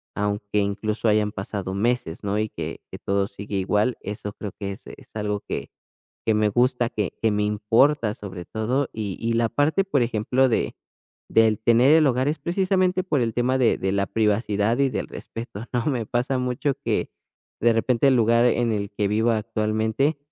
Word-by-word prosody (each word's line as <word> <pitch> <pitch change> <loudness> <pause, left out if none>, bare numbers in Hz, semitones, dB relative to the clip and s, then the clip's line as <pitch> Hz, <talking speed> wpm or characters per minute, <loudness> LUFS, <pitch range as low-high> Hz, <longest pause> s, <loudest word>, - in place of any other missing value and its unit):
aunque 105 0 -2
incluso 105 +3 -1
hayan 105 -1 +3
pasado 95 -1 -5
meses, 110 -4 -1
¿no?, 100 +1 -1
y 110 0 -1
que - - -6
que - - -8
todo 100 0 0
sigue 100 0 -7
igual, 105 +5 +1
eso 105 0 -6
creo 105 -1 -6
que 100 -1 -3
es - - -12
es - - -13
algo 105 -1 -1
que - - -4 0.6
que 110 - +3
me 105 0 +3
gusta, 125 +2 +2
que 105 -5 -2
que 110 - +3
me 105 0 0
importa, 110 +3 +2
sobre 95 -4 -8
todo 125 +8 -1
y 105 -4 -4
y 115 0 0
la 115 0 +2
parte, 150 +10 +1
por 145 -9 +1
ejemplo, 125 +3 +1
de - - 0 0.6
del 110 -2 +4
tener 120 +5 +5
el 160 -2 +6
hogar 130 +1 +2
es 150 +1 -1
precisamente 185 +3 +1
por 150 -7 +1
el 115 -1 0
tema 125 +2 +1
de 125 -3 +3
de 95 0 -1
la 100 0 +1
privacidad 105 0 +1
y 140 -1 +3
del - - -3
respeto, 115 -2 -8
¿no?, 125 0 -1
me 125 -6 0
pasa 125 +2 0
mucho 125 +2 -1
que - - 0 0.5
de 120 +1 +4
repente 115 +3 +2
el 130 - +4
lugar 115 0 +4
en 120 -1 +2
el 100 -1 -2
que 100 0 0
vivo 110 +3 +2
actualmente, 110 +6 0
110 Hz, 190 wpm, -24 LUFS, 105-125 Hz, 0.6 s, el